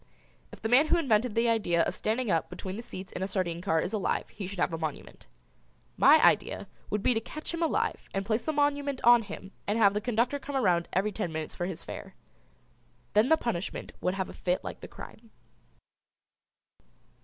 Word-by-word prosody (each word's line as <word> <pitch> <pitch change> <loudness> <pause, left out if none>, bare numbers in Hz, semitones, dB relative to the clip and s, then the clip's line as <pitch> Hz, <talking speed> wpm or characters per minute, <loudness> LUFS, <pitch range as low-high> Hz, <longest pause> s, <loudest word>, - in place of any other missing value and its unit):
If - - -13
the - - +1
man 260 +7 +5
who 345 - +3
invented 240 -7 +2
the 230 +1 +3
idea 190 -7 +2
of - - -1
standing 225 0 -1
up 165 - +1
between 190 0 -6
the 225 - -5
seats 190 -5 -8
in - - -6
a 190 - 0
sardine 175 -4 -2
car 160 -4 +1
is 185 - -2
alive 210 -3 -1
he 200 -3 -6
should 200 +1 -7
have 170 - +1
a - - -1
monument. 155 -3 -6 0.7
My - - +7
idea - - +2 0.2
would 210 -1 -1
be 250 - +4
to 225 - +1
catch 305 +9 -7
him 335 - -3
alive 330 - 0
and 195 0 -2
place 220 +2 +1
the 315 - -1
monument 285 -2 0
on 240 0 +7
him 200 -2 -9 0.2
and 205 +2 +1
have 200 -3 +5
the 210 - -1
conductor 245 +5 0
come 280 0 -6
around 180 -9 +2
every 195 +4 +1
ten 190 -5 -3
minutes 155 -1 -4
for 175 - -3
his 185 -4 -6
fare. - - -8 1.0
Then 215 +5 +4
the 320 - +6
punishment 200 - -3
would 180 +1 0
have 190 -1 -2
a - - -9
fit 180 0 -1
like - - -6
the - - -9
crime. 225 0 -12
210 Hz, 210 wpm, -29 LUFS, 185-245 Hz, 1.0 s, My